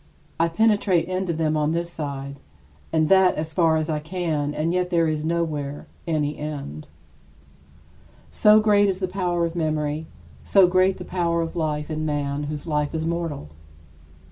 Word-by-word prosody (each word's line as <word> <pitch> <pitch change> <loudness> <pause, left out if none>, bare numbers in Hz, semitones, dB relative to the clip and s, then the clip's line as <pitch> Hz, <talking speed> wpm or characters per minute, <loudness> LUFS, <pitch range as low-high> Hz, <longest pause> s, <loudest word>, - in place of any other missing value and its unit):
I 165 0 +3
penetrate 200 -2 +2
into 185 -1 -1
them 155 -1 0
on 150 +1 +1
this 170 +1 -2
side 140 -2 -5 0.5
and 155 -1 +2
that 190 -1 +5
as 155 +1 -4
far 165 -2 +3
as 155 -1 -1
I 155 -2 -1
can 160 -3 -2
and 165 +3 0
yet 180 0 0
there 170 -2 +2
is 155 -1 -1
nowhere 155 -4 -2 0.2
any 150 -2 -1
end. 140 - -6 1.4
So 210 0 +6
great 205 -1 +4
is 185 -1 -2
the 185 - -1
power 180 -2 -1
of 165 0 -4
memory, 155 -1 -1 0.4
so 195 -2 +5
great 185 +1 +3
the 180 - -8
power 170 -2 0
of 165 - -6
life 155 -2 -2
in 155 0 -2
man 145 -1 -2
whose 150 0 -5
life 150 -1 -1
is 160 0 -2
mortal! 165 - -3
160 Hz, 170 wpm, -23 LUFS, 150-180 Hz, 1.4 s, So